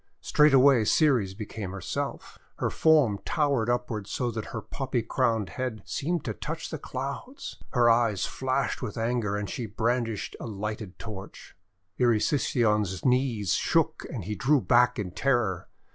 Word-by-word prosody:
Straightway 135 -4 +5
Ceres 115 - +3
became 105 -2 -6
herself. 95 -3 -5 0.2
Her - - -1
form 150 -11 +4
towered 140 -7 +1
upward 120 -4 -1
so 120 +1 -2
that 110 -1 -4
her 115 - -5
poppy 130 0 -3
crowned 115 -3 0
head 125 -6 -4
seemed 160 +1 -2
to - - -2
touch 165 +2 -5
the 155 - -4
Clouds. 140 - -6 0.2
Her 120 -2 +4
eyes 115 -4 +3
flashed 130 0 -1
with 115 -5 -5
anger, 115 -3 0
and 105 0 -3
she 120 +2 -4
brandished 115 0 -1
a - - -6
lighted 105 -2 -5
torch. 100 -4 -9 0.4
Erysichthon's 110 - +2
knees 125 -7 +2
shook - - +1
and - - -4
he 105 +5 -3
drew 140 +7 +3
back 125 0 +3
in 100 -5 -3
terror. 105 -5 0
120 Hz, 145 wpm, -27 LUFS, 105-130 Hz, 0.4 s, Straightway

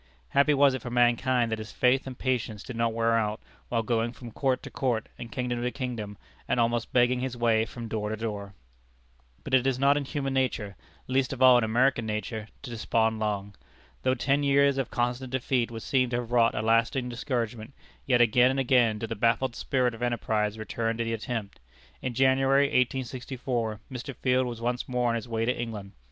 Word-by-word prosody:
Happy 140 +2 +4
was 140 -1 +5
it 130 - -3
for 120 - -6
mankind 120 0 +2
that 110 - -2
his 110 +1 -7
faith 130 +2 +2
and 130 -2 -7
patience 120 -5 -2
did 125 - -7
not 115 0 +1
wear 115 0 +1
out, 110 -1 0 0.3
while 115 -2 0
going 115 0 0
from 120 -1 -10
court 130 +2 0
to - - -8
court, 120 -5 -1
and 115 - -8
kingdom 125 -2 -2
to 125 - 0
kingdom, 120 -6 -5 0.3
and - - +1
almost 120 0 0
begging 125 0 +3
his 125 -1 -3
way 115 -2 +2
from 120 0 -7
door 105 -1 -3
to 110 - -3
door! 105 -3 -5 0.9
But - - -7
it 130 0 +4
is 130 -2 +1
not 140 +2 +4
in 145 - -2
human 135 -1 -3
nature 120 -7 -1 0.3
least 130 0 0
of 130 -1 -1
all 130 -1 +8
in - - 0
American 120 +1 +2
nature 110 +1 -4 0.2
to 135 - -7
despond 110 -1 0
long. 100 -2 -2 0.5
Though 130 0 +2
ten 140 +3 +1
years 140 -1 +3
of 135 - -2
constant 125 +1 -2
defeat 125 -2 0
would 115 -2 -7
seem 130 -2 +1
to 120 - -2
have 120 -1 -3
wrought 115 -1 +3
a 110 - -1
lasting 115 +3 +2
discouragement, 120 -1 -3 0.3
yet 125 -2 +4
again 120 +2 +5
and 135 +1 0
again 120 -4 +3
did 110 +1 -5
the 115 - -3
baffled 120 +3 +1
spirit 125 -3 0
of 115 - -11
enterprise 110 -3 0
return 115 +1 -2
to 115 - 0
the 115 0 -2
attempt. 115 -2 -4 0.4
In 125 -2 -3
January, 135 +2 +4
1864, 125 -3 -1
Mr. 130 +1 -6
Field 130 0 +1
was 120 -1 -6
once 120 +2 -2
more 125 -1 +1
on 115 - +1
his 115 +1 -5
way 115 0 -1
to 125 - +1
England. 105 -4 -5
120 Hz, 205 wpm, -27 LUFS, 115-130 Hz, 0.9 s, all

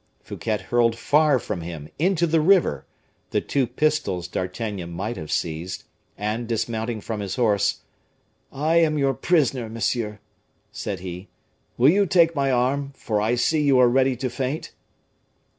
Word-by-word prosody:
Fouquet 110 -2 -3
hurled 115 +1 +1
far 150 +2 +3
from 95 -6 -4
him, 80 -3 -7
into 175 0 +2
the 160 -1 +2
river, 165 - +3 0.4
the - - +1
two 135 -3 0
pistols 125 - 0
D'Artagnan 95 0 -4
might 105 +7 -4
have 75 -6 -7
seized, 85 +3 -3 0.3
and 110 +3 -2
dismounting 115 0 -2
from 110 0 -4
his 100 -2 -4
horse 100 -5 +1 0.7
"I 155 +4 +1
am 160 -2 +3
your 135 -1 +2
prisoner, 135 -10 +1
monsieur," 110 -1 -2 0.5
said - - -5
he; 90 +1 -7 0.5
"will 130 +4 +6
you 200 +2 +3
take 170 -2 +4
my 140 -1 +1
arm, 135 +3 0
for 105 -5 -1
I 110 +3 +1
see 150 +6 +1
you 140 -3 +4
are 125 -1 +6
ready 130 +1 +3
to 130 +1 -3
faint?" 130 +4 -3
120 Hz, 155 wpm, -23 LUFS, 105-145 Hz, 0.7 s, will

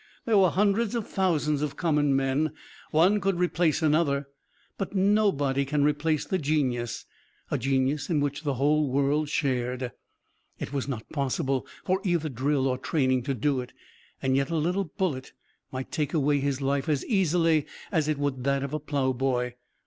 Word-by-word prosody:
There 220 -3 +4
were 185 -2 +5
hundreds 205 +5 +1
of 230 -3 -2
thousands 150 -6 +1
of 150 -2 -2
common 150 -4 +2
men. 135 +3 +1 0.4
One 185 +7 +4
could 195 -1 +1
replace 170 -2 +1
another, 150 -2 +2 0.5
but 195 0 -4
nobody 190 -9 +2
could 145 +2 0
replace 150 +1 +1
the 190 - -1
genius, 130 -6 -1 0.5
a - - 0
genius 135 +3 0
in 160 -4 +2
which 145 0 -1
the 145 -3 -1
whole 145 +2 +2
world 140 +3 +1
shared. 125 -3 -1 0.7
It - - -6
was 140 -1 -2
not 125 -6 -5
possible 135 -1 -1 0.2
for 185 +1 +1
either 170 -4 0
drill 135 +2 0
or 130 -1 -1
training 130 -3 +1
to 135 - -1
do 130 +2 0
it, 125 - -10 0.5
and 130 0 +2
yet 135 0 +1
a 165 - -1
little 180 +5 0
bullet 155 -6 -3 0.4
might 130 0 -5
take 150 -1 -1
away 145 -1 +2
his 140 0 -1
life 140 +1 0
as 145 -3 0
easily 165 - +2 0.2
as 160 -6 +1
it 155 -2 0
would 140 -3 -2
that 140 0 +1
of 140 +1 -4
a 155 - -1
plowboy. 130 -4 0
145 Hz, 170 wpm, -27 LUFS, 135-165 Hz, 0.7 s, were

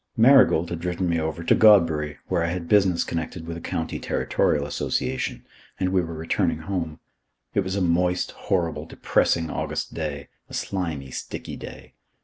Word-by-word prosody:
Marigold 120 - +6
had 85 - -3
driven 90 +1 -2
me 85 -1 +1
over 80 +1 -3
to - - +4
Godbury, 80 -9 +5
where 90 -2 +1
I - - 0
had 85 0 -3
business 95 -3 +4
connected 85 +1 -4
with 85 0 -5
a 85 - -7
County 80 0 -3
Territorial 70 -1 0
Association, 75 - -2 0.3
and 95 - +1
we 95 0 +2
were 85 -1 -5
returning 80 0 0
home. 80 -3 -3 0.5
It - - +2
was 95 -1 -1
a 100 - 0
moist, 90 +1 +1
horrible, 85 -5 -2
depressing 80 -1 +1
August - - -3
day. 75 -3 -4 0.2
A - - -7
slimy, 80 -9 -3
sticky - - -6
day. - - -10
85 Hz, 165 wpm, -24 LUFS, 80-90 Hz, 0.5 s, Marigold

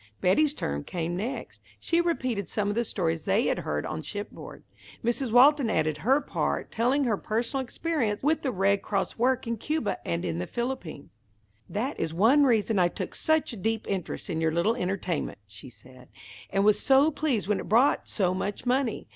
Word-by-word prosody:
Betty's 290 +11 +3
turn 70 0 -3
came 175 0 -3
next. 220 +9 -5 0.2
She 335 +1 +1
repeated 255 - -1
some 205 -1 -1
of - - 0
the 235 +3 0
stories 165 -7 -2
they - - +2
had - - 0
heard 75 0 -3
on 155 0 -4
shipboard. 205 +5 -7 0.4
Mrs. 240 +1 0
Walton 265 +1 +6
added 155 -6 0
her 260 - +3
part 285 - -2
afterward, - - -33
telling 255 +5 +1
her 225 -6 +1
personal 235 +7 -2
experience 250 -6 -2
with 310 +3 +2
the 265 - -1
Red 200 -1 +2
Cross 200 +2 -2
work 255 +2 +2
in 230 0 -2
Cuba 300 -2 -2
and 85 0 -2 0.2
the 90 - -4
Philippines. 235 - -5 0.6
"That 245 +8 -3
is 160 0 -2
one 255 - +5
reason 220 -4 +2
I 175 - +5
took - - -5
such 315 -5 +1
a - - -7
deep 220 +3 -2
interest 190 -3 -4
in 165 -4 -2
your 160 0 +2
little 170 +7 +2
entertainment," 185 - -2
she 100 +5 -12
said, 125 +1 -17 0.4
"and 195 +1 +1
was 210 -1 +4
so 275 +3 +4
pleased 275 -9 -1
when 210 -1 +1
it - - -7
brought 240 +7 +3
so 185 -4 +1
much 200 +5 -4
money. 250 -2 0
215 Hz, 190 wpm, -27 LUFS, 180-260 Hz, 0.6 s, Walton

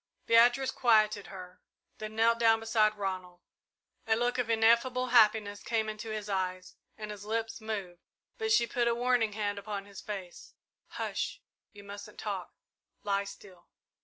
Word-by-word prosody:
Beatrice 240 +3 +5
quieted 215 -4 +3
her, 185 -1 -11 0.4
then 215 0 -6
knelt 230 +1 +3
down 225 -1 +5
beside 220 -1 +2
Ronald. 185 -3 -4 0.7
A 220 - +4
look 245 +2 0
of 240 -2 -1
ineffable 235 +3 +3
happiness 215 -3 +4
came 225 -2 -1
into 215 +1 -6
his 215 -1 -4
eyes 185 -2 -3 0.2
and 215 -1 -6
his 205 -1 -8
lips 225 +2 -3
moved, 200 -5 -5 0.4
but 440 0 -1
she 235 - +5
put 235 +1 0
a 235 - +2
warning 240 -3 +1
hand 205 -1 -2
upon 200 -1 -5
his 200 -1 -11
face. 195 -6 -8 0.3
"Hush - - -4 0.3
you 205 -1 -13
mustn't 200 0 -10
talk - - -4 0.5
lie 200 -1 0
still!" 195 -2 -13
215 Hz, 155 wpm, -30 LUFS, 200-230 Hz, 0.7 s, Beatrice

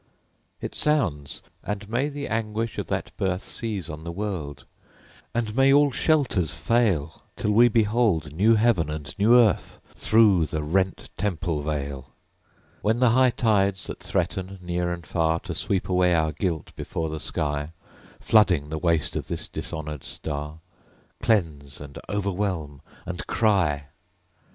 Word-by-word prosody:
It - - -5
sounds! 90 - 0 0.2
And 105 -1 -4
may 125 +7 0
the 145 -1 -5
anguish 115 0 -2
of - - -4
that - - -3
birth 95 -1 -1
Seize 105 -7 -4
on 80 -1 -7
the 85 - -5
world; 85 -7 -4 0.7
and 115 -2 -2
may 135 +1 +5
all 145 0 +5
shelters 130 - +1
fail, 95 -9 0
Till 105 - -1
we 115 +3 +6
behold 105 -9 +2
new 110 +6 +5
Heaven 105 -8 +2
and 75 -1 -6
new 110 +4 +6
Earth 115 -4 +2
Through 105 -7 +4
the 75 0 -3
rent 95 +4 -1
Temple 85 -6 -1
vail! 70 -3 -4 0.7
When 110 +2 +2
the 125 -1 +4
high 130 +2 +5
tides 100 -5 +1
that - - -7
threaten 95 +1 -2
near 90 0 -2
and 85 -2 -5
far 80 0 +1
To - - -5
sweep 95 -2 -1
away 90 -1 +3
our 80 -1 +2
guilt 80 +1 -3
before 80 -1 -3
the 80 0 -4
sky, 75 +1 -2 0.5
Flooding 90 -10 +3
the 80 0 -3
waste 85 -3 +1
of - - -3
this - - -4
dishonored 75 -3 -5
Star, 75 +1 -5 0.6
Cleanse, 80 - 0
and 70 -1 -9
o'erwhelm, 95 -8 -2 0.2
and 90 -1 -5
cry! 90 -11 +2
90 Hz, 145 wpm, -25 LUFS, 80-110 Hz, 0.7 s, we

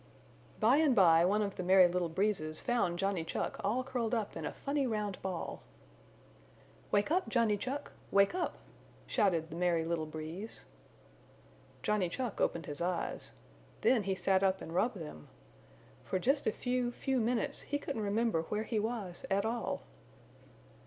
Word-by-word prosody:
By 230 +6 +5
and 300 -5 +4
by 165 -5 +6
one 210 +3 +2
of 200 -1 -4
the - - -2
Merry 185 0 +7
Little 175 -1 -1
Breezes 165 -4 0
found 235 -9 0
Johnny 195 -2 0
Chuck 165 - -3
all 225 +6 +1
curled 250 -3 -1
up 215 -3 -2
in - - -3
a - - -3
funny 280 -1 -1
round 210 -4 -2
ball. 185 -3 -4 1.3
"Wake 205 +7 +2
up 365 +2 +1
Johnny 230 -4 +3
Chuck! 255 +7 -4 0.2
Wake 200 0 +4
up!" 360 -1 -2 0.5
shouted 175 - +1
the - - -6
Merry 170 -2 +1
Little 165 -2 -1
Breeze. 160 +7 -7 1.2
Johnny 210 -4 +1
Chuck 240 +3 -3
opened 165 -2 0
his 145 +2 -5
eyes. 175 0 -2 0.5
Then 235 0 +4
he 195 -1 -1
sat 190 +1 +2
up 190 -1 +2
and 165 - -8
rubbed 215 +5 +1
them. 150 - -8 0.8
For - - -1
just 275 +9 +1
a - - +4
few, 245 +1 -1
few 265 +1 -1
minutes 235 0 0
he 290 - -2
couldn't 280 -5 -4
remember 210 -3 +1
where 210 +6 -2
he 220 0 -1
was 210 -5 -3
at 200 +1 +2
all. 230 +1 -2
205 Hz, 165 wpm, -33 LUFS, 175-240 Hz, 1.3 s, Merry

